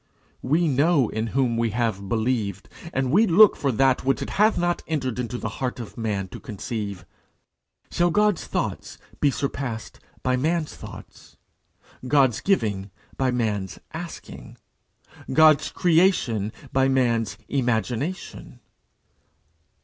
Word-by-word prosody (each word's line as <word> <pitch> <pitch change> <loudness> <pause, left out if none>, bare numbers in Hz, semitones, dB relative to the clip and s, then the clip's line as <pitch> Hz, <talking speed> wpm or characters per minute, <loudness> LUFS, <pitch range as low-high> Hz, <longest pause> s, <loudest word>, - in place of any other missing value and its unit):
We 160 +6 +2
know 145 -2 +3
in 110 +1 -2
whom 120 -1 0
we 115 0 +1
have 105 -5 -1
believed, 110 -4 -1 0.2
and 135 -4 -1
we 215 +8 +5
look 205 +4 +7
for 140 - 0
that 130 +2 +2
which 135 +1 +1
it - - -6
hath 215 +2 +3
not 175 0 0
entered 130 -6 -2
into 125 0 -3
the 115 - -4
heart 125 -1 -2
of 115 - -8
man 105 -5 -2
to - - -9
conceive. 100 -3 -5 0.9
Shall 175 0 +2
God's 210 +1 +1
thoughts - - -3 0.2
be 145 - +4
surpassed 135 -4 -4 0.2
by 130 0 +1
man's 155 +3 -1
thoughts? - - -12 0.7
God's 135 -3 +3
giving 105 - 0 0.3
by 130 -1 +1
man's 105 -6 -2 0.2
asking? 165 +1 -8 0.7
God's 155 0 +5
creation 160 - +2 0.2
by 135 0 +3
man's 120 -5 +1
imagination? 125 - -2
130 Hz, 125 wpm, -24 LUFS, 115-155 Hz, 0.9 s, look